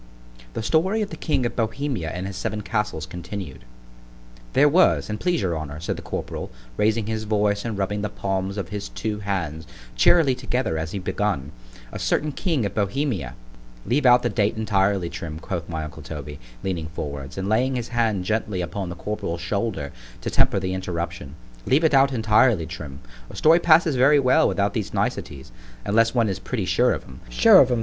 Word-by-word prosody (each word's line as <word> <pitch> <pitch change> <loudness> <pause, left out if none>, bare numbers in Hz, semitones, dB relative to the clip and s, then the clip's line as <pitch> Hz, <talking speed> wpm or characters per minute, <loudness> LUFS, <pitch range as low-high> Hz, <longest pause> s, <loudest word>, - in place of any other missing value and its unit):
THE 115 - -3
STORY 190 - +2
OF 205 - -6
THE - - -5
KING 130 -5 0
OF 120 - -2
BOHEMIA 115 - -2
AND 90 +3 -4
HIS 95 0 -5
SEVEN 105 +3 -3
CASTLES, 100 -6 -2
CONTINUED 90 -5 -7 0.9
THERE 145 +2 +6
was, 165 -7 +3
an' 105 - -3
please 175 +3 0
your 90 -3 0
honour, 75 -1 -5
said 85 - -2
the - - -7
corporal, - - -5 0.3
raising 110 - +1
his 110 0 -3
voice 105 -1 +1
and 115 -4 -3
rubbing 100 +1 -1
the 105 - -2
palms 95 0 -2
of 95 -4 -4
his 100 0 -5
two 105 -1 -3
hands 85 -6 -3 0.3
cheerily 145 - +5
together 125 -9 -1
as 80 0 -4
he - - -3
begun, 95 -6 -2 0.4
a - - -6
certain 150 0 0
king 150 - -1
of 100 - -3
Bohemia—— 100 - -1 0.5
——Leave 135 +2 +2
out 125 0 +6
the 120 - +1
date 105 0 0
entirely, 100 -4 +1
Trim, 85 -2 -6
quoth 85 0 -5
my 80 -2 -3
uncle 75 - -8
Toby, 75 -2 -7 0.2
leaning 85 -4 -2
forwards, 70 -4 -6
and 95 0 -2
laying 125 +5 +2
his 120 -2 -3
hand 110 -6 0
gently 105 -2 -1
upon 90 +1 -4
the 90 - -5
corporal's 85 -3 -4
shoulder 95 -6 -2 0.3
to - - -3
temper - - +3
the 95 -1 -2
interruption—leave 85 - -3
it 160 - +3
out 135 0 +5
entirely, 110 -5 +3
Trim; 75 -4 -8 0.3
a - - -10
story 160 +2 +5
passes 160 -3 +5
very 145 +4 +6
well 135 +4 +4
without 100 0 0
these 110 -4 -3
niceties, 65 -3 -3 0.3
unless 115 +3 +3
one 115 -2 +3
is 95 -3 -2
pretty - - -3
sure - - +3
of - - -2
'em——Sure - - +4
of 130 - +4
'em! 120 -2 +1
100 Hz, 190 wpm, -24 LUFS, 85-120 Hz, 0.9 s, THERE